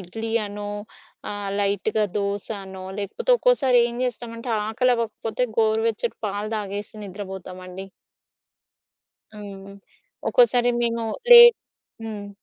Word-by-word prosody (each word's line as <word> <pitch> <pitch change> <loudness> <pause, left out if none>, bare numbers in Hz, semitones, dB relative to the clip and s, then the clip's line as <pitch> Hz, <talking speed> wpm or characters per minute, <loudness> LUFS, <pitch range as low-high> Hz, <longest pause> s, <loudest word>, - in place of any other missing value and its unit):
ఇడ్లీ 220 +5 -6 0.2
అనో, 205 0 -6 0.6
ఆహ్, 205 -1 -4
లైట్‌గా 205 +2 0
దోస 200 0 -2 0.2
అనో, 190 -1 -9
లేకపోతే 205 - -3
ఒక్కోసారేం 250 - +3
జేస్తామంటే 235 -1 -5 0.2
ఆకలి 245 +3 +2
అవ్వకపోతే 230 +1 -2
గోరువెచ్చట 225 - +1
పాలు 205 +1 -4
తాగేసి 205 +1 -5
నిద్రపోతామండి. 190 -1 -8 1.5
హ్మ్. 200 -2 -9 0.6
ఒక్కోసారి 250 - +4
మేము 230 -1 -1 0.3
లేట్ 475 -1 +11 0.5
హ్మ్. 210 -2 -6
215 Hz, 95 wpm, -23 LUFS, 200-235 Hz, 1.5 s, లేట్